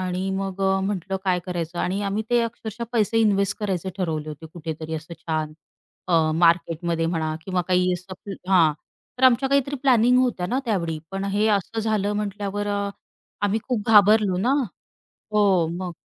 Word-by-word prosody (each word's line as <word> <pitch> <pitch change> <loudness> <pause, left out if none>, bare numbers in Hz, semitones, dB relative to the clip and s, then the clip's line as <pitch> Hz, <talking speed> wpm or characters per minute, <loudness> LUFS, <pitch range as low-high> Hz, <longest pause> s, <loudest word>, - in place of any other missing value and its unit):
आणि 185 +1 -2
मग 195 0 -3
अ, 190 0 +2
म्हटलं 195 -1 -2
काय 185 -1 +2
करायचं? 175 -1 -4
आणि 195 +4 -1
आम्ही 200 +2 -1
ते 240 0 +4
अक्षरशः 230 0 -5
पैसे 225 -1 +2
इन्वेस्ट 200 -3 +2
करायचे 190 -3 -2
ठरवले 160 -4 -2
होते 155 +1 -8
कुठेतरी 160 -1 -6
असं 160 +2 -7
छान 155 -2 -2 0.6
अ, 160 -3 +3
मार्केटमध्ये 165 0 +2
म्हणा 160 -2 -1
किंवा 185 -2 -1
काही 180 0 +3
असं 185 +3 -7 0.2
हां, 170 -5 +5 0.5
तर 260 - +3
आमच्या 260 +1 +5
काहीतरी 280 +1 +1
प्लॅनिंग 250 -2 +5
होत्या 245 -8 +1
ना 245 +7 0
त्यावेळी. 170 -9 -1
पण 195 0 -3
हे 205 +2 +1
असं 205 +2 -1
झालं 210 -2 0
म्हटल्यावर 205 0 -3
अ, 200 0 -1 0.5
आम्ही 205 +2 +2
खूप 230 -4 -2
घाबरलो 210 -2 +6
ना. 235 +7 +1 0.8
हो, 195 -5 +3
मग 175 +2 -4
195 Hz, 165 wpm, -24 LUFS, 170-210 Hz, 0.8 s, घाबरलो